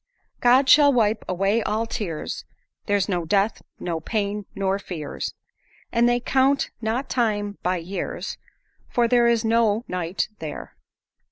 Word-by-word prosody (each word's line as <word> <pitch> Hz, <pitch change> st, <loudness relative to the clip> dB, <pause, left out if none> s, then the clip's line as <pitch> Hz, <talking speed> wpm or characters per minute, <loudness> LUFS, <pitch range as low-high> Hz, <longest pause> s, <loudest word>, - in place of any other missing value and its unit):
"God 255 Hz, +3 st, +5 dB
shall 290 Hz, +1 st, +7 dB
wipe 220 Hz, -4 st, +2 dB
away 195 Hz, +5 st, +1 dB
all 215 Hz, +2 st, -1 dB
tears; 200 Hz, -9 st, -4 dB, 0.4 s
There's 205 Hz, -2 st, +2 dB
no 180 Hz, -4 st, -1 dB
death, 200 Hz, +5 st, +1 dB, 0.2 s
no 170 Hz, -2 st, -2 dB
pain, 205 Hz, +1 st, -2 dB
nor 195 Hz, 0 st, 0 dB
fears; 160 Hz, -7 st, -5 dB, 0.6 s
And 235 Hz, 0 st, +3 dB
they 240 Hz, 0 st, +2 dB
count 265 Hz, +3 st, +2 dB
not 235 Hz, +5 st, -1 dB
time 205 Hz, -4 st, -1 dB
by 180 Hz, +1 st, 0 dB
years, 175 Hz, +4 st, -5 dB, 0.5 s
For 240 Hz, -1 st, +2 dB
there 240 Hz, 0 st, +4 dB
is 235 Hz, -1 st, +2 dB
no 225 Hz, 0 st, +2 dB
night 180 Hz, 0 st, -2 dB
there. 155 Hz, -2 st, -7 dB
210 Hz, 140 wpm, -24 LUFS, 190-235 Hz, 0.6 s, shall